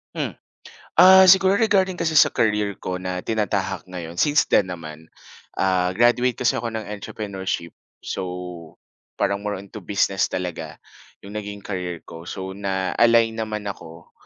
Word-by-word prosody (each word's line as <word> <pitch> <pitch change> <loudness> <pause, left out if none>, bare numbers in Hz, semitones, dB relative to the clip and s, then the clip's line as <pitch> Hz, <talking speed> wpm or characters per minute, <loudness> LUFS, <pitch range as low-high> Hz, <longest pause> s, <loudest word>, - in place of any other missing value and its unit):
Hmm, - - -3 0.7
ah, 190 +1 +9
siguro 190 +1 +6
regarding 190 -4 +2
kasi 165 -2 -1
sa 150 - +6
career 105 -3 0
ko, 90 0 -5
na 90 0 -4
tinatahak 95 -5 -2
ngayon, 85 -1 -6
since 150 0 +4
then 95 - +4
naman, 80 -2 -8 0.5
ah, 95 -1 +1
graduate 120 +1 +3
kasi 125 - +1
ako 115 - -3
ng 110 - -4
Entrepreneurship. 95 -4 -5 0.3
So, 90 -3 -6 0.4
parang 100 0 0
more 105 0 -3
on 95 +1 -12
to 110 - -7
business 95 0 0
talaga, 85 -4 -5 0.5
yung 100 - -10
naging 100 -1 -9
career 90 -4 -5
ko. 85 +1 -11
So, 95 0 -5
na-align 100 +4 +2
naman 110 -2 -4
ako, 85 -4 -9
100 Hz, 145 wpm, -22 LUFS, 90-115 Hz, 0.7 s, ah